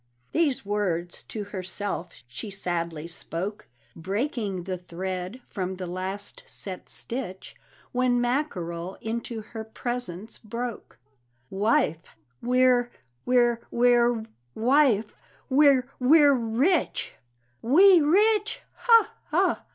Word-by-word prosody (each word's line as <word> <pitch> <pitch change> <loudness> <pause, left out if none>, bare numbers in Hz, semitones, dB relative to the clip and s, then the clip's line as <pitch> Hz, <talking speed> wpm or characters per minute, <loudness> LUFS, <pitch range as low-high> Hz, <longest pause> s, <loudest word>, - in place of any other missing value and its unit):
These 300 -9 +1
words 180 -4 -2
to 215 - -6
herself 190 -5 -5
she 125 - -7
sadly 170 -4 -3
spoke, 170 +4 -5 0.3
Breaking 200 - -2
the 185 0 -4
thread 185 +5 -5
from 190 -2 -4
the 185 0 -5
last 185 +3 -5
set 185 -2 -6
stitch, 230 -7 -3 0.4
When 250 -1 +2
Mackerel 190 - -2
into 225 0 -4
her 220 0 -7
presence 220 -3 -4
broke 235 +1 -6 0.5
"Wife, 190 -5 0 0.3
we're 250 0 +3 0.4
we're 240 -2 +3
we're, 240 -1 +3 0.3
wife, 240 -3 +3 0.4
we're 270 -2 +5
we're 290 +2 +6
rich!" 255 +8 0 0.5
"We 350 +8 +7
rich! 420 +7 +3
ha, 460 -2 +4
ha! - - +1
225 Hz, 100 wpm, -26 LUFS, 185-255 Hz, 0.5 s, We